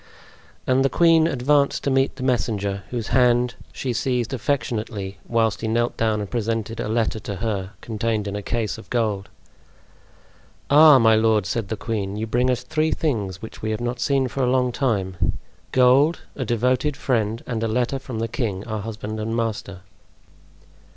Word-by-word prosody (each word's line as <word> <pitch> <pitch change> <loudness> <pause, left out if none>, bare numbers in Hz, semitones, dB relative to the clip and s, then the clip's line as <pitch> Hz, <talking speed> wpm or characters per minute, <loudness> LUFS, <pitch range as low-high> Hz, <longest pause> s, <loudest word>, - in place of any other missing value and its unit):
And 130 +1 +3
the 135 - +3
queen 165 0 +4
advanced 140 0 +2
to 140 - 0
meet 135 0 +2
the 130 - -7
messenger, 105 -6 0
whose 120 -2 -4
hand 125 -1 +3 0.2
she 130 -2 -3
seized 125 +1 -1
affectionately, 110 -6 -2
whilst 115 -2 +1
he 110 - -2
knelt 120 +2 0
down 110 -2 0
and 100 - -4
presented 115 0 -2
a - - -2
letter 110 -1 0
to 100 -1 -5
her, 100 -1 -3
contained 110 -1 -2
in 100 - -3
a 105 - -3
case 110 +1 -2
of - - -14
gold. 105 -5 -1 1.4
"Ah! 150 0 +9
my 110 -2 +5
lord!" 110 -2 +3
said 115 0 -2
the 110 - -3
queen, 105 -3 -3
"you 110 - -2
bring 120 +3 +1
us 125 -1 0
three 155 +4 0
things 105 - -2
which 110 - -9
we 110 - -2
have 110 - -2
not 120 +1 -3
seen 135 -2 +1
for 135 - -4
a 125 - +2
long 125 -1 +2
time. 100 -9 -1 0.4
Gold, 130 +6 +4
a 130 - -3
devoted 125 +5 +1
friend, 115 -5 -1
and 115 -3 -3
a 115 - 0
letter 125 +4 0
from 130 -3 -7
the 115 +1 -1
king, 105 -5 -3
our 110 -3 -4
husband 110 0 -5
and 110 +1 -2
master." 110 -5 -3
115 Hz, 180 wpm, -23 LUFS, 110-130 Hz, 1.4 s, Ah